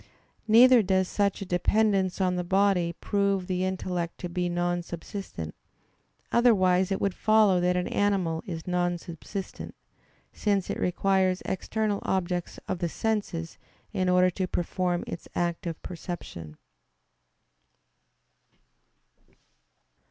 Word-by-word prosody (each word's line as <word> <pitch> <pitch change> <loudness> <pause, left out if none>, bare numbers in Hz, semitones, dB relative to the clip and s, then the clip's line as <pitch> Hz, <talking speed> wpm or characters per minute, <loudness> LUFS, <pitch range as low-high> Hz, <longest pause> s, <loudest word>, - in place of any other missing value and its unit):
Neither 240 +2 +7
does 190 -2 +1
such 200 0 0
a - - -8
dependence 190 +1 +1
on 185 -1 +1
the 180 - -1
body 185 -2 +2
prove 200 +1 0
the 185 0 -1
intellect 180 -2 -2
to 180 - -4
be 180 +1 -1
non 175 0 0
subsistent; 170 - -7 0.8
otherwise 190 -6 +4
it 195 - 0
would 200 -2 0
follow 215 -3 +4
that 180 0 +2
an 180 - -1
animal 190 -6 0
is 165 -3 -5
non 175 -1 0
subsistent, 175 +4 -7 0.6
since 200 -3 0
it - - -4
requires 185 0 +1
external 210 +2 -1
objects 180 -2 -2
of 180 - -2
the 170 - -1
senses 200 -6 -2 0.3
in 185 -1 +1
order 180 0 +4
to 185 +1 -2
perform 175 0 -1
its 170 - -7
act 175 0 -1
of 165 -1 -4
perception. 160 - -7
185 Hz, 120 wpm, -27 LUFS, 175-195 Hz, 0.8 s, Neither